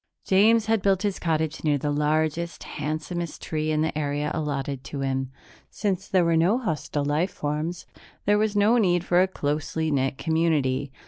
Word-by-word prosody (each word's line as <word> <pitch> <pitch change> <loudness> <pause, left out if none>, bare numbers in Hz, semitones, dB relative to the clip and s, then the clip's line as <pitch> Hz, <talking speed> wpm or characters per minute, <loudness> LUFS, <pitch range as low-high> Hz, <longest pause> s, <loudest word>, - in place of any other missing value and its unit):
James 215 +4 +4
had 225 -2 +1
built 195 0 +2
his 200 -2 -1
cottage 160 -2 -1
near 150 -2 +2
the 145 +2 -2
largest, 155 +3 0
handsomest 155 +3 -4
tree 155 -1 -2
in 155 0 +1
the 160 - -2
area 145 0 -1
allotted 140 -3 -3
to 140 - -6
him; 135 -1 -1 0.4
since 195 -3 -2
there 185 -2 +3
were 170 0 +3
no 175 +8 +3
hostile 155 - -2
life 150 +6 +1
forms, 155 +4 -3 0.4
there 205 +1 +3
was 215 -1 0
no 210 +4 +4
need 175 -5 +2
for 175 +1 +4
a 190 - +3
closely 155 -1 -2
knit 135 -1 0
community. 150 -5 0
160 Hz, 175 wpm, -25 LUFS, 145-185 Hz, 0.4 s, James